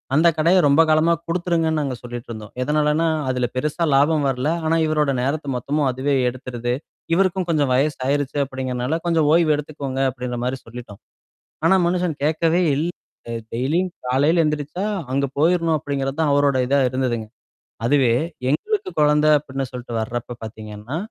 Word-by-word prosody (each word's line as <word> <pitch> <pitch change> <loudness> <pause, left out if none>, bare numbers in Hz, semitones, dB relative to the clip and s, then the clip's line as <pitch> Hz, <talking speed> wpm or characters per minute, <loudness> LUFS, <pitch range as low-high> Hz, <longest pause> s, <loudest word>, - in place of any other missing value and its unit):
அந்த 160 +3 +5
கடைய 170 +4 +4
ரொம்ப 140 +3 +5
காலமா 155 +2 +4
குடுத்துருங்கன்னு 165 -2 0
நாங்க 135 -3 -2
சொல்லிட்டு 120 -1 -7
இருந்தோம். 110 -1 -9
எதனாலன்னா 150 +3 +1 0.2
அதுல 125 -1 0
பெருசா 150 +6 -1
லாபம் 150 +1 +3
வரல. 130 +1 -1 0.2
ஆனா 160 - +2
இவரோட 150 -2 +1
நேரத்த 145 +3 -2
மொத்தமும் 140 +4 0
அதுவே 130 +3 -1 0.2
எடுத்துருது. 120 -1 -4 0.4
இவருக்கும் 185 0 +2
கொஞ்சோ 150 -3 +2
வயசு 145 +3 +1
ஆயிருச்சு 145 +1 -1
அப்படிங்கிறனால 130 +2 -2
கொஞ்சம் 165 -3 +2
ஓய்வு 165 -2 +4
எடுத்துக்கோங்க 145 -3 -5
அப்படின்ற 125 -1 -5
மாரி 130 +1 -1
சொல்லிட்டோம். 115 -3 -10 0.7
ஆனா 165 - +5
மனுஷன் 175 -2 0
கேக்கவே 160 +3 +2
இல்ல. 160 +5 -1 0.4
அ 115 - -4 0.2
டெய்லியும் 155 +10 0 0.2
காலையில 145 +7 +3
எந்திரிச்சா, 150 +5 -2 0.3
அங்க 140 +1 +1
போயிரணும் 165 0 +3
அப்படிங்கிறது 140 0 -3
தான் 150 -3 +2
அவரோட 140 -1 +3
இதா 140 +2 +2
இருந்ததுங்க. 125 -4 -1 0.6
அதுவே 130 -3 +3 0.4
எங்களுக்கு 395 - -1
குழந்தை 150 +1 +4
அப்படின்னு 135 -1 -5
சொல்ட்டு 125 -1 -7
வரப்ப 120 +2 -4
பாத்தீங்கன்னா. 110 +4 -7
145 Hz, 150 wpm, -21 LUFS, 130-160 Hz, 0.7 s, அந்த